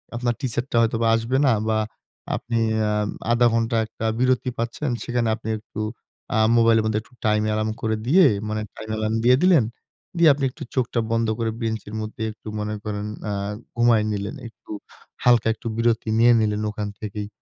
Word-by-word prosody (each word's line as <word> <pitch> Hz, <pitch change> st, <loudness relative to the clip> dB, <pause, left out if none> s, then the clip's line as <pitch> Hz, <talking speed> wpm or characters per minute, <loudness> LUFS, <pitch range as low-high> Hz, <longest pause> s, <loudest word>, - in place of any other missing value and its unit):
আপনার 120 Hz, 0 st, 0 dB
টিচারটা 125 Hz, -1 st, -2 dB
হয়তো 115 Hz, 0 st, +1 dB, 0.2 s
আসবে 115 Hz, +4 st, 0 dB
না 135 Hz, -, +5 dB, 0.2 s
বা 110 Hz, -, +2 dB, 0.6 s
আপনি 115 Hz, -1 st, -2 dB, 0.3 s
আম 105 Hz, 0 st, 0 dB, 0.2 s
১/২ 120 Hz, 0 st, +5 dB
ঘন্টা 115 Hz, +1 st, +1 dB
একটা 110 Hz, 0 st, -7 dB
বিরতি 130 Hz, 0 st, +2 dB
পাচ্ছেন। 115 Hz, +5 st, -2 dB
সেখানে 120 Hz, -1 st, -1 dB
আপনি 110 Hz, 0 st, -7 dB
একটু 110 Hz, 0 st, -8 dB, 0.5 s
আ -, -, +2 dB, 0.2 s
মোবাইলের 115 Hz, -1 st, +4 dB
মধ্যে 110 Hz, -1 st, +1 dB
একটু 115 Hz, -, -24 dB
টাইম 105 Hz, 0 st, +3 dB
এলার্ম 110 Hz, 0 st, 0 dB
করে 110 Hz, 0 st, 0 dB
দিয়ে। 180 Hz, +8 st, +6 dB, 0.2 s
মানে 110 Hz, 0 st, -2 dB
টাইম 110 Hz, -, -9 dB
এলার্ম 110 Hz, 0 st, -1 dB
দিয়ে 125 Hz, +1 st, +6 dB
দিলেন। 175 Hz, -8 st, +6 dB, 0.5 s
দিয়ে 170 Hz, -2 st, +6 dB
আপনি 140 Hz, 0 st, -5 dB
একটু -, -, -9 dB
চোখটা 120 Hz, -2 st, 0 dB
বন্ধ 115 Hz, 0 st, +1 dB
করে 115 Hz, -1 st, 0 dB
বেঞ্চের 110 Hz, -2 st, -3 dB
মধ্যে 110 Hz, +1 st, -7 dB
একটু 105 Hz, -, -15 dB
মনে 105 Hz, 0 st, -3 dB
করেন 105 Hz, -1 st, -4 dB, 0.3 s
আ -, -, -1 dB, 0.4 s
ঘুমায়ে 115 Hz, -2 st, +4 dB
নিলেন। 100 Hz, +4 st, -3 dB
একটু 110 Hz, -2 st, -15 dB, 0.5 s
হালকা, 120 Hz, -2 st, +4 dB
একটু 115 Hz, -, -8 dB
বিরতি 115 Hz, -1 st, +1 dB
নিয়ে 120 Hz, +1 st, +6 dB
নিলেন 105 Hz, -1 st, 0 dB
ওখান 105 Hz, -1 st, -4 dB
থেকেই। 105 Hz, -1 st, -5 dB
115 Hz, 175 wpm, -23 LUFS, 110-120 Hz, 0.6 s, দিয়ে